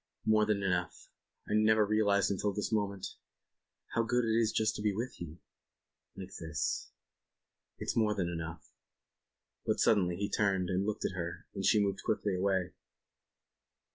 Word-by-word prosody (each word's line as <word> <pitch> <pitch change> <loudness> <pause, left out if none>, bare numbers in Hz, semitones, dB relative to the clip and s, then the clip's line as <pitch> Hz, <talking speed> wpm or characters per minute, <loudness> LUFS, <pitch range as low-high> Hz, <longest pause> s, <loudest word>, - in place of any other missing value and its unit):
"More 110 -1 +4
than 100 -2 +1
enough. 90 -3 -2 0.4
I - - -2
never 110 0 +5
realized 100 -2 +2
until 100 +1 0
this 105 +3 -2
moment.. 100 -2 -2 0.3
." - - -58
"How 115 - +3
good 120 +1 +1
it 110 0 +1
is 115 -1 +3
just 110 - +1
to - - -5
be 105 -2 +1
with 120 -1 -4
you... 85 -1 -7 0.4
." - - -56
"Like 95 0 -8
this... 80 -4 -2 0.5
." - - -58
"It's - - -3
more 110 -3 +2
than 90 -3 0
enough." 85 -2 -6 0.9
But - - 0
suddenly 90 -5 +3
he 100 +3 -1
turned 95 -3 +1
and 95 +2 0
looked 105 0 -2
at - - 0
her 85 -1 -5
and 95 - -4
she 105 - +5
moved 100 -1 0
quickly 105 -2 0
away. 95 -1 0
100 Hz, 170 wpm, -32 LUFS, 90-110 Hz, 0.9 s, never